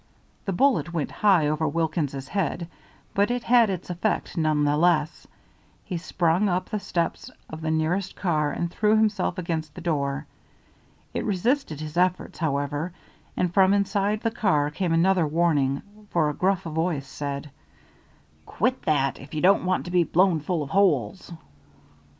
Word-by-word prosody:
The 195 - -1
bullet 250 -2 +2
went 160 -4 -2
high 190 -8 +3
over 155 +1 0
Wilkins's 150 -4 -2
head, 175 -3 -2 0.5
but 200 +2 +2
it 245 0 -1
had 235 -3 +5
its 185 -2 -4
effect 175 0 -2
none 155 -2 +1
the 145 0 +2
less. 160 -1 +1 0.6
He 185 - -4
sprang 175 +3 +1
up 180 +1 -1
the 210 - -1
steps 175 +5 -2 0.2
of 160 0 -7
the 160 - -2
nearest 160 +4 0
car 155 -5 0
and 170 +4 -3
threw 215 +2 +2
himself 210 -5 +1
against 160 -4 -3
the - - -8
door. 145 -3 -1 0.9
It - - -2
resisted 210 - 0
his 155 +1 -6
efforts, 180 0 0
however, 145 +2 -1 0.4
and 180 -1 0
from 190 +1 +5
inside 200 +1 0
the 230 - 0
car 150 -10 +1
came 175 +3 -2
another 170 0 +3
warning, 145 -4 +1 0.3
for 155 -3 +1
a - - -7
gruff 190 +5 0
voice 160 -3 -2
said: 140 +1 -5 1.0
"Quit 255 +1 0
that, 140 -3 +1
if 140 +3 -10
you 150 - -1
don't 190 0 +4
want 185 0 0
to 175 - -6
be 175 -1 +4
blown 175 0 +3
full 160 +1 -2
of 140 - -9
holes." 180 - +1
170 Hz, 160 wpm, -25 LUFS, 150-190 Hz, 1.0 s, had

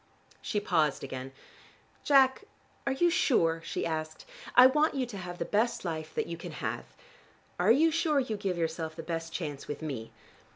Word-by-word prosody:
She 210 - -1
paused 160 -8 +1
again. 130 -1 -6 0.7
"Jack, 270 +5 +4 0.4
are - - +3
you 345 +6 +3
sure?" 165 - +2
she - - -3
asked. 155 -1 -4 0.3
"I 250 - +10
want 300 +4 +4
you 265 -2 0
to 230 -4 -8
have 175 -1 -6
the 170 - -2
best 215 +2 0
life 155 -2 -4
that - - 0
you 170 - -6
can 170 - -8
have. - - -4 0.7
Are 180 +4 +3
you 315 +7 +5
sure 315 -2 +2
you 250 -5 -2
give 195 -3 -2
yourself 160 -1 -2
the 165 - -7
best 165 0 -4
chance 150 -4 -5
with 145 +2 -5
me? 130 -7 -5
175 Hz, 180 wpm, -30 LUFS, 160-260 Hz, 0.7 s, I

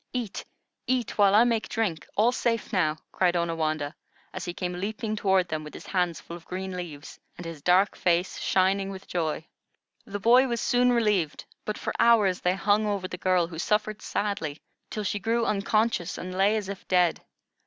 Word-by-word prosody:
"Eat, 240 -4 -3 0.4
eat, 245 -4 -1
while 200 -1 +6
I 220 - +7
make 230 -2 0
drink. 195 -9 -2
All 225 +4 +4
safe 230 -2 -1
now," 160 -5 +2
cried 180 -1 +2
Onawandah, 155 -3 -1 0.4
as 185 - -5
he 175 - -3
came 180 0 -4
leaping 215 +2 -3
toward 190 -3 +2
them 155 -2 -3
with 150 - -10
his - - -10
hands 180 -3 0
full 170 - -9
of 170 -1 -12
green 190 0 -4
leaves, 160 -5 -8 0.2
and 175 - -8
his 165 -3 -7
dark 185 +5 +3
face 175 +1 +1
shining 195 +1 +2
with 195 0 -8
joy. 160 -2 -2 0.6
The 205 0 -4
boy 245 +6 +5
was 235 -2 -1
soon 245 +2 +3
relieved, 210 -10 +1 0.2
but 215 - -3
for - - -3
hours 210 -6 +4
they 180 +1 +2
hung 205 +2 +2
over 200 -3 -1
the 180 - -6
girl, 180 0 +2
who 165 -1 -8
suffered 210 +2 0
sadly, 165 -8 -2 0.3
till 215 - -4
she 205 +1 -1
grew 230 +3 0
unconscious 210 -3 0
and 185 +1 -6
lay 195 +3 +3
as 205 -3 -4
if 200 -1 -7
dead. 180 -2 +2
190 Hz, 190 wpm, -27 LUFS, 175-215 Hz, 0.6 s, I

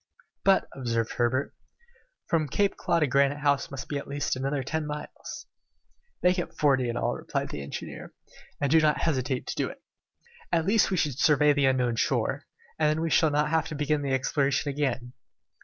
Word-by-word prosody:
"But," 195 -1 +4
observed 115 -4 -2
Herbert, 125 +3 0 0.7
"from 160 -3 +1
Claw - - -7
Cape - - -22 0.3
to - - +5
Granite 140 +2 +2
House 145 -1 +1
there - - -14
must 135 -1 -6
be 145 - -2
at - - -9
least 145 -1 -2
another 135 +1 -2
ten 155 +3 -2
miles." 150 - -7 0.8
"Make 180 +1 +4
it 175 - -5
forty 135 -4 +3
miles - - -1
in 120 - -2
all," - - 0
replied - - -3
the 75 - -5
engineer, 70 - -7 0.5
"and 140 -1 0
do 160 - +6
not 150 -1 +2
hesitate 130 -4 0
to - - -4
do - - -1
it. - - -13 0.7
At 165 -2 +2
least 210 +3 +3
we 190 - 0
should 145 -5 0
survey 150 0 +5
the 140 -1 +2
unknown 125 -3 +1
shore, - - 0 0.3
and 155 -1 +3
then 155 +1 0
we 165 -1 -1
shall 160 - +4
not 150 +1 +1
have 160 -1 +1
to 155 - -6
begin 150 0 0
the 140 -1 -2
exploration 135 +2 +1
again." 130 -3 -2
145 Hz, 200 wpm, -27 LUFS, 130-155 Hz, 0.8 s, do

